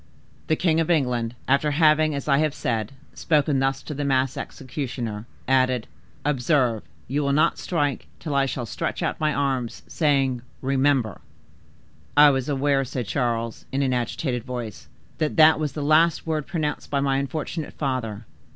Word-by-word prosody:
"The 155 - +3
king 165 -1 +2
of 165 - 0
England, 125 -7 +1
after 140 +3 +3
having, 155 0 +3
as 140 - -5
I 140 -1 +4
have 155 -2 +1
said, 115 0 -2 0.2
spoken 150 -3 +1
thus 135 0 0
to 150 - -6
the 145 +1 -3
masked 130 -2 +1
executioner, 120 -5 -5 0.2
added,—'Observe, 130 0 0 0.3
you 145 +3 0
will 140 -1 +1
not 150 - +2
strike 145 -6 -1
till 150 - -4
I 140 -1 +2
shall 125 -2 -3
stretch 110 - -3
out - - -1
my 155 -1 +2
arms, 130 -5 -1
saying—REMEMBER!'" 135 - 0 1.0
"I 145 0 +9
was 135 0 -1
aware," 140 0 +2
said 125 -1 -4
Charles, 115 -1 -2
in 135 +1 0
an 130 -1 +1
agitated 125 +1 -2
voice, 120 -9 -6 0.3
"that 155 -2 0
that 155 0 +7
was 150 -3 -2
the 150 - -4
last 155 +2 +3
word 155 -3 -2
pronounced 155 -3 -3
by 140 - 0
my 135 -1 +1
unfortunate 155 +3 -4
father. 120 -6 -3
135 Hz, 160 wpm, -24 LUFS, 125-150 Hz, 1.0 s, I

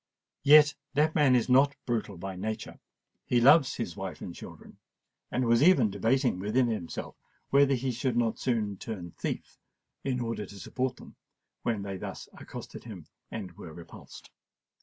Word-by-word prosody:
Yet 145 0 +7 0.2
that 155 +2 +3
man 145 -5 +4
is 120 - +2
not 135 +3 +4
brutal 110 -5 -2
by 95 +2 -6
nature: 110 +4 -5 0.5
he 125 - +3
loves 140 +3 +6
his - - -4
wife - - -6
and - - -7
children—and 125 +1 -8
was 115 +1 +4
even 145 - +5
debating 110 0 +1
within 110 +6 +2
himself 110 -8 -4 0.4
whether 140 0 +5
he 130 +1 -1
should 125 0 -1
not 115 -2 +1
soon 110 -6 -1
turn 95 -6 -6
thief - - -5 0.4
in 130 -2 -1
order 115 -3 -3
to 100 - -11
support 130 +8 -2
them, - - -14 0.4
when 110 -4 -1
they 100 -1 -5
thus - - -7
accosted - - -9
him - - -9 0.2
and 100 -5 -6
were 85 -3 -11
repulsed. 85 +1 -12
120 Hz, 160 wpm, -29 LUFS, 100-135 Hz, 0.5 s, Yet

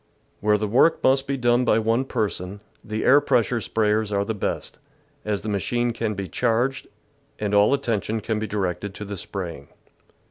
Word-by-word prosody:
Where 105 +1 +3
the 105 0 -2
work 130 +10 +3
must 135 +1 +3
be 140 0 -1
done 120 0 +3
by 110 - +3
one 115 +4 +1
person, 100 -5 -3 0.2
the 110 +1 -3
air 140 +3 +6
pressure 120 -3 +1
sprayers 105 -1 0
are 100 0 +1
the 110 - -2
best, 105 - -4 0.4
as 105 -2 -2
the - - -7
machine 120 +4 0
can 115 -2 -2
be 100 -1 -4
charged, 120 +7 0 0.5
and 105 -1 -2
all 105 +3 +5
attention 115 -5 0
can 110 0 -2
be 110 - -3
directed 100 0 -3
to 105 - -6
the 100 0 -5
spraying. 85 -6 -6
110 Hz, 180 wpm, -24 LUFS, 100-120 Hz, 0.5 s, air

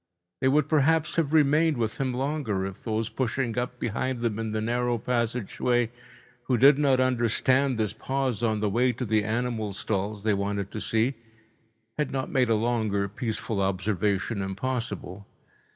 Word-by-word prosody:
They - - +1
would 150 +3 +3
perhaps 155 +1 +2
have 160 -4 0
remained 155 0 +4
with 115 -2 -2
him 130 -1 0
longer, 130 -7 -1
if 95 +1 -7
those 110 -1 -1
pushing 125 -1 -2
up 125 0 -4
behind 120 +2 -2
them 115 -2 -1
in 110 -1 -3
the 110 - -1
narrow 120 +2 0
passage 120 -1 -2
way, 120 -2 +2 0.5
who 125 - +2
did 140 +4 +6
not 135 -3 +3
understand 130 +1 +2
this 105 -2 -1
pause 130 -1 -2
on 110 -3 0
the 105 - +1
way 125 +4 +2
to 125 +2 -4
the 110 -1 +2
animal 110 -1 -2
stalls 100 +1 -2
they 110 -1 +2
wanted 100 0 -2
to 110 - -5
see, 115 +4 +1 0.9
had 150 - +1
not 135 -1 -3
made 125 -3 +2
a 115 - +4
longer 110 -3 0
peaceful 110 0 -3
observation 100 +2 0
impossible. 100 -2 -4
115 Hz, 170 wpm, -27 LUFS, 105-130 Hz, 0.9 s, did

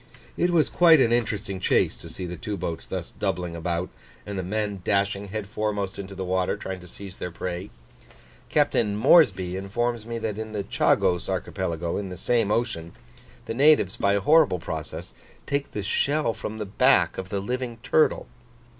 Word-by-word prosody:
It 175 - +2
was 170 -3 +3
quite 165 -3 +6
an 120 -3 +4
interesting 105 -5 -1
chase - - +2
to - - -9
see 90 - -5
the 90 0 -5
two 105 +1 -5
boats 85 -3 -4
thus - - -5
doubling 90 -1 -3
about, 85 +1 -2 0.4
and 100 - -5
the 95 - -1
men 100 +1 -2
dashing 100 0 0
head 105 +1 -4
foremost 105 -2 -2
into 100 0 -7
the 95 0 -4
water 95 0 0
trying 95 -1 -5
to 90 - -13
seize 95 +1 -10
their 90 - -3
prey. 90 +3 -5 0.8
Captain 105 -3 +2
Moresby 100 - +4
informs 115 +4 -2
me 115 0 -3
that 110 -2 -3
in 110 0 -6
the 105 -2 -2
Chagos 90 -2 +2
archipelago 85 0 -2
in 100 -2 -4
this 90 -2 -8
same 115 -4 +2
ocean, 105 -8 -1 0.5
the - - -3
natives, 135 -6 +4
by 100 - +2
a 100 - +1
horrible 150 - +5
process, 80 +1 -6 0.3
take 140 0 -2
the 105 - -4
shell 140 +5 +1
from 110 0 -6
the 105 - -3
back 100 -4 +3
of 95 0 -6
the 100 - -1
living 125 +3 -3
turtle. 155 - +2
100 Hz, 180 wpm, -25 LUFS, 90-115 Hz, 0.8 s, quite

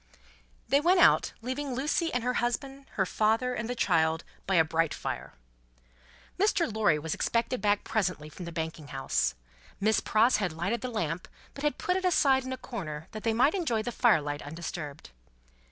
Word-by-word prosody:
They 280 - +4
went 355 +3 +4
out, - - +5
leaving 260 +1 -3
Lucie, 300 +5 0
and 245 -1 -1
her 250 +1 0
husband, 270 +3 -3
her 195 - +1
father, 220 +6 +1
and 235 -1 -3
the 245 - -2
child, 160 -7 +2 0.2
by 190 - +2
a 165 - +6
bright 160 0 0
fire. - - -5 1.1
Mr. 395 -3 +3
Lorry 210 -8 +3
was 150 +1 -3
expected 235 +2 0
back 205 -1 +2
presently 180 -8 -1
from 175 +3 -9
the 170 - -6
Banking 160 -2 -5
House. 130 - 0 0.4
Miss 215 +2 +3
Pross 225 +4 +3
had 185 -6 -1
lighted 195 +8 -2
the 255 - -3
lamp, 180 -7 -3 0.3
but 280 - -8
had 295 - +1
put 365 +1 0
it 380 - -3
aside 275 -7 +3
in 260 - -5
a 260 - -3
corner, 160 - -6
that 215 - -6
they 225 - +1
might 255 +8 +3
enjoy 285 - 0
the 240 - -3
fire 230 -10 +4
light 145 0 -4
undisturbed. 155 - -7
220 Hz, 185 wpm, -29 LUFS, 165-260 Hz, 1.1 s, a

